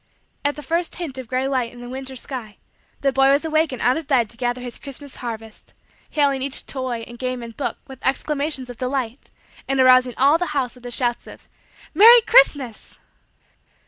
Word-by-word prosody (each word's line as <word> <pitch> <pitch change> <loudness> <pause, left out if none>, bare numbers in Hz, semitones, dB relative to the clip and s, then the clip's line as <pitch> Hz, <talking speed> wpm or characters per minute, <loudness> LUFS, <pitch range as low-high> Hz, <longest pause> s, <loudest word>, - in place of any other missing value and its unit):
At 285 0 0
the 295 - -9
first 335 +4 -1
hint 300 -7 -6
of 255 - -8
gray 255 +2 -1
light 255 -4 -1
in 245 - -13
the 245 - -9
winter 265 +1 -7
sky, 240 -4 -5 0.4
the 275 -1 +1
boy 270 +1 +4
was 280 +3 +3
awake 315 -1 +1
and 255 - -6
out 250 +4 +3
of 320 -3 -6
bed 240 -6 +2
to - - -14
gather 245 0 -1
his 245 -1 -7
Christmas 280 0 -8
harvest; 225 -2 -8 0.3
hailing 280 -3 +1
each 270 0 -2
toy 255 -4 -4
and 240 0 -12
game 255 -1 -3
and 230 -1 -9
book 245 -5 -3
with 265 -2 -13
exclamations 280 0 -1
of 245 -1 -10
delight 255 -1 -3 0.4
and 270 0 0
arousing 255 -1 +5
all 285 +5 +4
the 355 - -1
house 255 -3 -1
with 250 -1 -16
his 245 - -3
shouts 240 -2 -1
of: - - -13 0.5
"Merry 460 +8 +9
Christmas." 290 - +3
260 Hz, 200 wpm, -22 LUFS, 245-285 Hz, 0.5 s, Merry